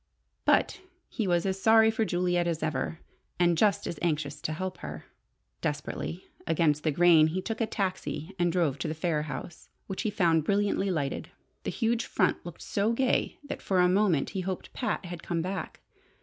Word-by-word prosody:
But 395 Hz, -, +3 dB, 0.3 s
he 220 Hz, -5 st, -2 dB
was 175 Hz, 0 st, +2 dB
as 195 Hz, 0 st, -1 dB
sorry 220 Hz, +1 st, +6 dB
for 220 Hz, 0 st, 0 dB
Juliet 175 Hz, -2 st, +1 dB
as 165 Hz, -2 st, -1 dB
ever, 155 Hz, +1 st, -1 dB, 0.4 s
and 175 Hz, -1 st, +4 dB
just 205 Hz, +5 st, +2 dB
as 170 Hz, -, -4 dB
anxious 150 Hz, -3 st, -1 dB
to -, -, -2 dB
help 185 Hz, +4 st, -4 dB
her. 75 Hz, 0 st, -7 dB, 0.6 s
Desperately 150 Hz, +4 st, -3 dB, 0.2 s
against 155 Hz, -3 st, +2 dB
the 155 Hz, -, +2 dB
grain, 160 Hz, 0 st, +6 dB
he 170 Hz, +4 st, -2 dB
took 220 Hz, +5 st, -4 dB
a 225 Hz, -, +2 dB
taxi 190 Hz, -4 st, -3 dB
and 175 Hz, -1 st, +3 dB
drove 165 Hz, -6 st, +1 dB
to -, -, -2 dB
the 155 Hz, -, -3 dB
Phayre 155 Hz, -2 st, 0 dB
house, 155 Hz, +3 st, -7 dB, 0.2 s
which 190 Hz, -, -4 dB
he 215 Hz, -, 0 dB
found 170 Hz, -6 st, +2 dB
brilliantly 200 Hz, +2 st, +1 dB
lighted. 145 Hz, -6 st, -2 dB, 0.4 s
The -, -, 0 dB
huge 230 Hz, -1 st, 0 dB
front -, -, +1 dB
looked 175 Hz, -2 st, -9 dB
so 205 Hz, +3 st, 0 dB
gay 260 Hz, +2 st, +1 dB
that 285 Hz, -, -6 dB
for 190 Hz, -2 st, +1 dB
a 180 Hz, -, +6 dB
moment 185 Hz, -5 st, +2 dB
he 190 Hz, -, -2 dB
hoped 185 Hz, 0 st, -5 dB
Pat 250 Hz, -6 st, -2 dB
had 175 Hz, -1 st, -6 dB
come 165 Hz, -1 st, -2 dB
back. 190 Hz, +2 st, -5 dB
175 Hz, 190 wpm, -29 LUFS, 160-200 Hz, 0.6 s, sorry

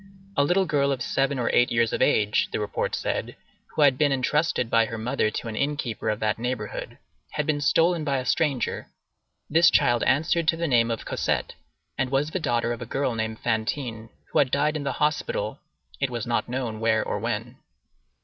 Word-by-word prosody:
A 140 Hz, -, +4 dB
little 180 Hz, +6 st, +2 dB
girl 140 Hz, -4 st, +1 dB
of 130 Hz, -3 st, -2 dB
seven 135 Hz, 0 st, 0 dB
or 120 Hz, -, 0 dB
eight 120 Hz, -, +4 dB
years 115 Hz, -1 st, +2 dB
of -, -, -1 dB
age, 105 Hz, -1 st, +2 dB
the -, -, -2 dB
report 105 Hz, -1 st, -2 dB
said, -, -, -3 dB, 0.4 s
who 155 Hz, -, +4 dB
had 135 Hz, -3 st, +4 dB
been 145 Hz, -2 st, +3 dB
intrusted 135 Hz, 0 st, +1 dB
by 115 Hz, 0 st, +3 dB
her 115 Hz, +1 st, -6 dB
mother 115 Hz, 0 st, 0 dB
to 110 Hz, -, -5 dB
an 110 Hz, -, -5 dB
inn 145 Hz, +5 st, 0 dB
keeper 120 Hz, -6 st, -3 dB
of 105 Hz, -, -1 dB
that 110 Hz, 0 st, 0 dB
neighborhood, 120 Hz, -3 st, -4 dB, 0.4 s
had 150 Hz, -1 st, -1 dB
been 145 Hz, -1 st, 0 dB
stolen 165 Hz, +3 st, +3 dB
by 140 Hz, -2 st, 0 dB
a 130 Hz, -, -3 dB
stranger; 140 Hz, -1 st, 0 dB, 0.6 s
this 165 Hz, +3 st, +5 dB
child 120 Hz, -1 st, +3 dB
answered 160 Hz, +3 st, +2 dB
to 165 Hz, -, +3 dB
the 170 Hz, -, -1 dB
name 120 Hz, -4 st, +3 dB
of 115 Hz, -1 st, -3 dB
Cosette, -, -, -1 dB, 0.5 s
and 130 Hz, -1 st, +1 dB
was 140 Hz, +3 st, 0 dB
the 185 Hz, -, -1 dB
daughter 120 Hz, -5 st, 0 dB
of 120 Hz, -, -8 dB
a -, -, -4 dB
girl 135 Hz, -2 st, -1 dB
named 110 Hz, 0 st, -3 dB
Fantine, 115 Hz, 0 st, -2 dB, 0.2 s
who -, -, +2 dB
had 140 Hz, -, +3 dB
died 150 Hz, +3 st, +1 dB
in 145 Hz, -2 st, -3 dB
the 135 Hz, -, -1 dB
hospital, -, -, -1 dB, 0.4 s
it 135 Hz, -, 0 dB
was 120 Hz, -3 st, -4 dB
not 120 Hz, 0 st, -1 dB
known 120 Hz, -4 st, -3 dB
where 110 Hz, 0 st, +2 dB
or -, -, -2 dB
when. -, -, -3 dB
130 Hz, 205 wpm, -25 LUFS, 115-150 Hz, 0.6 s, this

